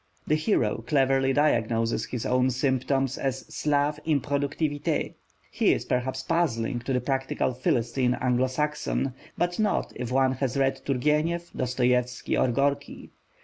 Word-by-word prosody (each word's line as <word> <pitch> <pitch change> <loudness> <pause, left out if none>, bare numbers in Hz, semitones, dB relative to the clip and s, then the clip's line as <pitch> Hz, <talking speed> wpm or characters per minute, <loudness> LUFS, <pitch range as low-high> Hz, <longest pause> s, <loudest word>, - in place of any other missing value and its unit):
The - - +1
hero 155 - +1
cleverly 135 -1 +3
diagnoses 115 -5 +1
his 125 -3 -5
own 125 +1 +2
symptoms 130 +1 0
as 135 -1 -2
Slave 150 0 +1
Improductivité. 145 0 -1 0.4
He - - +3
is - - -3
perhaps 130 +1 -1
puzzling 125 -7 0
to 125 +3 -3
the 125 - +2
practical 135 0 -1
Philistine 125 0 0
Anglo 125 0 +2
Saxon: 150 -1 -1 0.2
but 175 +2 -1
not 215 -1 0
if 125 -1 -5
one 130 0 +3
has 130 0 -2
read 135 -1 +1
Turgenev, 150 +6 0
Dostoievsky, 125 0 0
or - - +3
Gorky. 140 +3 -1
135 Hz, 135 wpm, -26 LUFS, 125-145 Hz, 0.4 s, cleverly